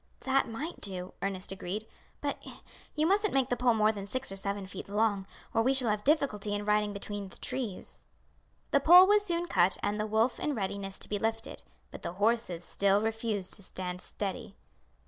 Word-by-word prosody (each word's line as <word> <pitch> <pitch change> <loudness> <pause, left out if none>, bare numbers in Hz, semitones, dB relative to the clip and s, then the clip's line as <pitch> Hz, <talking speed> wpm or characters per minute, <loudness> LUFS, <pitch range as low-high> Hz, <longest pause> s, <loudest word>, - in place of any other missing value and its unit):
"That 265 -1 +1
might 285 +10 -5
do," 185 -2 -4
Ernest 195 -2 -2
agreed; 195 +3 -4 0.4
"but - - -3 0.5
you 305 0 +2
mustn't 400 0 +2
make 265 -1 +2
the 245 - +1
pole 245 -1 +3
more 215 0 +4
than 200 -2 -7
six 255 0 -1
or - - -5
seven 200 0 -3
feet 190 - -8
long, 205 -2 +1 0.3
or 225 - +3
we 260 +4 +3
shall 250 -5 +4
have 210 0 -2
difficulty 235 -9 +1
in 205 0 -3
riding 210 0 +2
between 205 -1 -6
the - - -15
trees." 230 -8 -5 0.7
The 280 - +5
pole 350 +6 +9
was 415 +1 +4
soon 345 -3 -1
cut 185 - +3
and 205 +1 0
the 215 - -1
wolf 220 +3 +1
in 295 - -1
readiness 195 -2 -3
to - - -6
be 205 - -2
lifted, 225 +1 -3 0.3
but - - -9
the - - -4
horses 205 -3 0
still 200 +3 +2
refused 220 -4 -1
to - - -3
stand 180 -1 -4
steady. 210 +1 -4
210 Hz, 195 wpm, -30 LUFS, 195-255 Hz, 0.7 s, pole